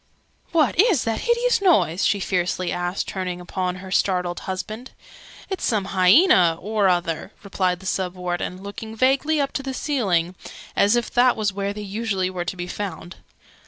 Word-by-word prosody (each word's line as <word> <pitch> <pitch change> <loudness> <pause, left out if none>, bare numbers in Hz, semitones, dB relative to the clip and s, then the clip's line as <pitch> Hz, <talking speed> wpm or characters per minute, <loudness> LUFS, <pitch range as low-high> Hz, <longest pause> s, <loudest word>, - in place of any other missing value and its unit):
"What 320 0 +2
is 395 - +4
that 225 -1 -1
hideous 475 -1 +1
noise?" 305 - +3
she 200 - +1
fiercely 180 -1 -1
asked, 175 +2 -2
turning 180 -2 -4
upon 180 0 -3
her 185 +1 -9
startled 180 -2 0
husband. 215 +6 -5 0.6
"It's 385 - -4
some 205 -4 0
hyaena 185 - +5
or 210 -1 +1
other," 175 +1 -1
replied 185 -2 -1
the - - -12
Sub 185 -1 -2
Warden, 180 +1 -4
looking 220 +2 -7
vaguely 270 +6 +2
up 280 -1 0
to - - -3
the 270 -1 -5
ceiling, 190 - 0 0.4
as 205 +3 +4
if 240 - -1
that 245 0 +4
was 210 -3 0
where 200 0 -2
they 210 +1 -7
usually 200 -2 -2
were 180 -1 -4
to 185 - -4
be 175 - -4
found. 180 -2 -6
195 Hz, 170 wpm, -23 LUFS, 180-240 Hz, 0.6 s, hyaena